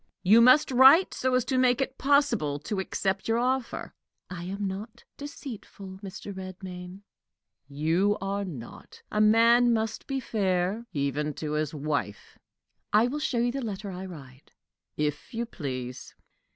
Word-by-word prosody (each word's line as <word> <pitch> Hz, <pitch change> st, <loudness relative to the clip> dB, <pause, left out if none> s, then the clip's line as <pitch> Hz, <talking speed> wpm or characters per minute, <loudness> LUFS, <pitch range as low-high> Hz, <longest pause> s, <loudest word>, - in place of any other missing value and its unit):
"You 215 Hz, +5 st, +6 dB
must 255 Hz, +4 st, +6 dB
write 265 Hz, +8 st, +7 dB
so 260 Hz, 0 st, 0 dB
as 255 Hz, -, +1 dB
to 260 Hz, -2 st, 0 dB
make 250 Hz, -1 st, +3 dB
it 270 Hz, -1 st, -3 dB
possible 260 Hz, -, +2 dB
to 195 Hz, +6 st, -3 dB
accept 190 Hz, 0 st, -2 dB
your 225 Hz, 0 st, +2 dB
offer." 255 Hz, +1 st, -2 dB, 0.4 s
"I 175 Hz, -1 st, -6 dB
am 200 Hz, +2 st, -4 dB
not 215 Hz, +5 st, -7 dB
deceitful, 225 Hz, -9 st, -9 dB
Mr. 200 Hz, 0 st, -8 dB
Redmain." 185 Hz, 0 st, -8 dB, 0.6 s
"You 165 Hz, +8 st, +1 dB
are 200 Hz, +1 st, -2 dB
not. 145 Hz, -12 st, -10 dB
A 210 Hz, -, +1 dB
man 230 Hz, +3 st, +5 dB
must 220 Hz, -1 st, -2 dB
be 270 Hz, -1 st, -2 dB
fair, 200 Hz, -1 st, -1 dB
even 145 Hz, -1 st, -2 dB
to 155 Hz, -1 st, -4 dB
his 150 Hz, 0 st, -2 dB
wife." 145 Hz, -8 st, -4 dB, 0.5 s
"I 215 Hz, +2 st, +5 dB
will 275 Hz, +5 st, -2 dB
show 295 Hz, -5 st, -1 dB
you 240 Hz, +1 st, +2 dB
the 275 Hz, +2 st, -4 dB
letter 205 Hz, -3 st, -5 dB
I 185 Hz, +1 st, -6 dB
write." 135 Hz, -6 st, -13 dB, 0.5 s
"If 150 Hz, -, -3 dB
you 235 Hz, +1 st, -1 dB
please." 130 Hz, -, -6 dB
200 Hz, 150 wpm, -27 LUFS, 175-240 Hz, 0.6 s, write